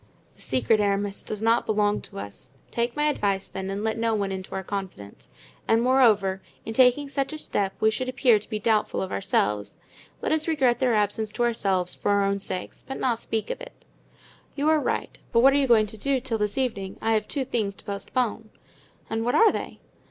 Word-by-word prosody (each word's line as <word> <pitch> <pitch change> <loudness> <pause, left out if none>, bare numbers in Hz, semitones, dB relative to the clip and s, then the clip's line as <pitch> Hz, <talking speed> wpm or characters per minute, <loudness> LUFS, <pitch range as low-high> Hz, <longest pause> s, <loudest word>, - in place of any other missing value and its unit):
"This - - -17
secret, 225 -4 +2
Aramis, 200 -1 0
does 215 0 -5
not 230 +1 +3
belong 210 -1 +1
to - - -13
us; 100 +5 -8 0.2
take 235 0 -1
my 295 - 0
advice, 200 -10 0
then, 190 0 -5
and 200 +2 -3
let 220 +1 -1
no 225 -1 +1
one 200 -2 -1
into 190 0 -6
our 190 - -3
confidence. 185 - -7 0.4
And 225 - +4
moreover, 215 -7 +3 0.2
in 225 - -4
taking 255 +4 +4
such 275 +1 -2
a - - -4
step 200 -9 -2
we 220 - +4
should 255 +3 -3
appear 250 -4 +4
to 205 - -13
be 215 - -2
doubtful 215 0 +1
of 190 - -6
ourselves. 105 - -1 0.4
Let - - -2
us 315 0 +1
regret 270 -7 +2
their 250 -3 +2
absence 210 +1 0
to 240 - 0
ourselves 195 -6 0
for - - -3
our 200 0 +3
own 200 0 0
sakes, 185 -2 -5
but 270 - -5
not 235 -3 0
speak 220 -2 -2
of - - -6
it." - - -12 0.7
"You 295 +2 +1
are 315 -1 +4
right; - - -3
but 230 - +4
what 270 +2 +6
are - - +3
you 280 -1 +2
going 225 -3 +5
to 215 +1 -8
do 275 +5 +1
until 245 -3 -1
this 210 +2 -1
evening? 215 -8 -2
I 225 - 0
have 215 -1 +1
two 275 -3 -2
things 215 -6 -2
to - - -16
postpone." 220 +2 -2 0.6
"And 225 0 -2
what 245 - +1
are 450 -2 +6
they?" - - -6
220 Hz, 220 wpm, -25 LUFS, 200-255 Hz, 0.7 s, what